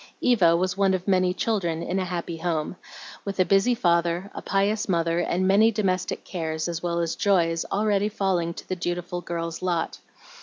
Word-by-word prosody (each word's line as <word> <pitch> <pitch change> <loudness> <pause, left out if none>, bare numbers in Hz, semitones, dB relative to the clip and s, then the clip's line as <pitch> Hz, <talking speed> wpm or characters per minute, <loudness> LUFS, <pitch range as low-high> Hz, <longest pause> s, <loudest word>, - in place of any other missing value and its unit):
Eva 180 -9 +4
was 185 +1 0
one 195 -1 +3
of 185 +1 -5
many 185 -2 +3
children 180 -5 -1
in 190 - -1
a 185 - -1
happy 170 -2 -4
home, 165 0 -2 0.5
with 195 -1 -5
a 185 - +5
busy 195 +6 +3
father, 170 -2 +1
a - - -6
pious 200 +2 0
mother, 170 -1 +1
and 180 +2 0
many 205 +4 +5
domestic 185 -4 -1
cares, 160 -3 -3
as 170 -1 -3
well 170 -1 -1
as 165 -1 -1
joys, 170 -4 +2
already 205 0 +1
falling 190 -5 0
to - - -10
the 185 - -2
dutiful 175 0 -3
girl's 165 -1 -4
lot. 175 -3 -1
180 Hz, 185 wpm, -25 LUFS, 170-195 Hz, 0.5 s, a